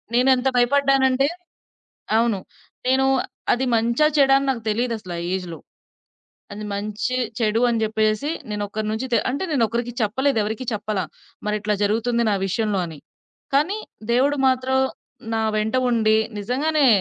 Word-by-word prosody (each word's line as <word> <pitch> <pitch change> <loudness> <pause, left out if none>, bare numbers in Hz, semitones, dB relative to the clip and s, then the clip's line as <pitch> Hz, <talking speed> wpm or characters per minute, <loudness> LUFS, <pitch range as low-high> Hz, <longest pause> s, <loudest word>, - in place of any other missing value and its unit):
నేనేంత 255 +1 +3
భయపడ్డానంటే 270 +1 +3 0.9
అవును. 230 -3 +2 0.5
నేను 265 +1 +3 0.5
అది 250 +2 +1
మంచా, 235 +6 +2
చెడా 270 -1 +6
అని 275 - -3
నాకు 235 -4 -3
తెలీదు 235 +2 0
అసలు 185 -5 -8
ఆ - - -3
ఏజ్‌లో. 180 -3 -5 0.9
అది 210 +1 -6
మంచి, 210 +5 -2 0.2
చెడు 225 -1 +1
అని 230 -2 0
జెప్పేసేసి 215 +5 0 0.2
నేను 210 0 -2
ఒకరి 215 +1 -4
నుంచి 220 +4 -2
తే 235 - +5
అంటే 280 +8 -2
నేను 260 -6 +3
ఒకరికి 235 +1 -3
చెప్పలేదు. 260 +5 +1
ఎవరికీ 220 +5 -4
చెప్పల. 210 -1 -2 0.5
మరిట్లా 210 0 0
జరుగుతుంది 230 +3 +1
నా - - +2
విషయంలో 210 +1 0
అని. 160 -3 -9 0.6
కానీ 320 +10 +2 0.3
దేవుడు 275 +4 +3
మాత్రం 260 0 +1 0.6
నా 225 - 0 0.2
వెంట 220 +3 0
ఉండి 220 -2 +3 0.2
నిజంగానే 280 +7 +1
235 Hz, 140 wpm, -22 LUFS, 215-265 Hz, 0.9 s, చెడా